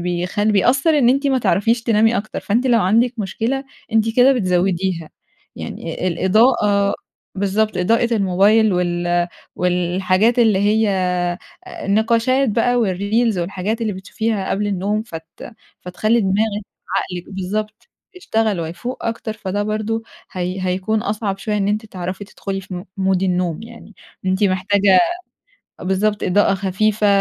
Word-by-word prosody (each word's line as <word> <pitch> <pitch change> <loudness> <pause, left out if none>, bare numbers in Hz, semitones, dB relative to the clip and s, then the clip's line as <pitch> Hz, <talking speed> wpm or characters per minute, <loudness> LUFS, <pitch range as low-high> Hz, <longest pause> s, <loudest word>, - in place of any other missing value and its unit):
بيخلّ 180 +4 -1
بيأثّر 270 - +3
إن 245 -4 +4
أنتِ 275 +3 +2
ما 265 -2 +2
تعرفيش 230 0 +1
تنامي 225 0 +3
أكتر، 215 +1 -4
فأنتِ 235 +6 0
لو 235 -3 +4
عندك 230 +6 +2
مشكلة 225 +7 -2 0.3
أنتِ 225 0 +1
كده 255 +2 +6
بتزوّديها. 185 -5 0 0.5
يعني - - -6
ال - - 0
الإضاءة 200 +1 +3 0.4
بالضبط، 200 +2 0
إضاءة 230 +5 +2
الموبايل 200 +2 +3
وال 175 -1 0 0.3
والحاجات 185 +5 +1
اللي 220 -5 +4
هي 210 +2 +2 0.8
النقاشات 230 +6 +1
بقى 230 +3 +1
والreels 205 +3 0
والحاجات 190 +5 -2
اللي 220 -2 -1
بتشوفيها 200 +2 -3
قبل 205 +1 0
النوم 205 +2 -1
فت 165 -7 -9 0.5
فتخلّي 215 +6 0
دماغِك، 205 +1 0 0.3
عقلِك، 180 0 -4
بالضبط، 210 - -4 0.3
يشتغل 220 - 0
ويفوُق 175 +10 -6
أكتر، 225 -1 -3
فده 205 -1 -3
برضه 215 +2 -2 0.3
هي 185 0 -3
هيكون 190 +4 0
أصعب 205 -2 -2
شوية 210 +2 -2
إن 200 -1 0
أنتِ 215 +2 -1
تعرفي 185 0 -6
تدخُلي 195 0 -5
في 190 -1 -9
م 180 +1 -6
مود 190 -1 +1
النوم 180 -2 -1
يعني. 230 -2 -13 0.3
أنتِ 190 +2 +2
محتاجة 190 0 +3 0.8
بالضبط 205 +3 0
إضاءة 200 +1 +3
خفيفة 200 +2 0
205 Hz, 135 wpm, -19 LUFS, 185-225 Hz, 0.8 s, كده